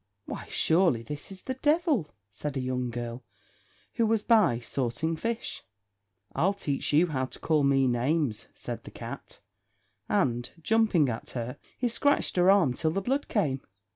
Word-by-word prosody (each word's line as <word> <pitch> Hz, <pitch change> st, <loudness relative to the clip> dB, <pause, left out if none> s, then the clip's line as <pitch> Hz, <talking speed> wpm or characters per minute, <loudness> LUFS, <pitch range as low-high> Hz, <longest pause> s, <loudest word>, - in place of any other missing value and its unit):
"Why, -, -, -6 dB
surely 160 Hz, -9 st, +3 dB
this 150 Hz, -, -6 dB
is 190 Hz, -1 st, -9 dB
the 260 Hz, -, -2 dB
devil," 295 Hz, -, +1 dB, 0.2 s
said 145 Hz, +7 st, -4 dB
a -, -, 0 dB
young 125 Hz, -1 st, -1 dB
girl, 120 Hz, +1 st, -5 dB, 0.7 s
who 230 Hz, -2 st, +2 dB
was 220 Hz, -1 st, +1 dB
by, 210 Hz, -, +4 dB
sorting 130 Hz, +6 st, -2 dB
fish. 230 Hz, +7 st, -3 dB, 0.7 s
"I'll 195 Hz, +4 st, +2 dB
teach 145 Hz, -8 st, -2 dB
you 155 Hz, +4 st, +5 dB
how 135 Hz, -6 st, -1 dB
to -, -, -11 dB
call 155 Hz, -2 st, +2 dB
me 135 Hz, -1 st, +4 dB
names," 125 Hz, 0 st, 0 dB
said -, -, -6 dB
the -, -, -9 dB
cat; -, -, -9 dB, 0.7 s
and, 120 Hz, -1 st, +1 dB
jumping 215 Hz, -5 st, +3 dB
at 115 Hz, -2 st, -4 dB
her, 120 Hz, +1 st, -4 dB, 0.2 s
he 250 Hz, -, +1 dB
scratched 285 Hz, +5 st, +1 dB
her 180 Hz, +1 st, +5 dB
arm 190 Hz, -10 st, +5 dB
till 160 Hz, -, 0 dB
the 165 Hz, -, 0 dB
blood 270 Hz, +8 st, -1 dB
came. 145 Hz, -, 0 dB
155 Hz, 165 wpm, -28 LUFS, 130-210 Hz, 0.7 s, you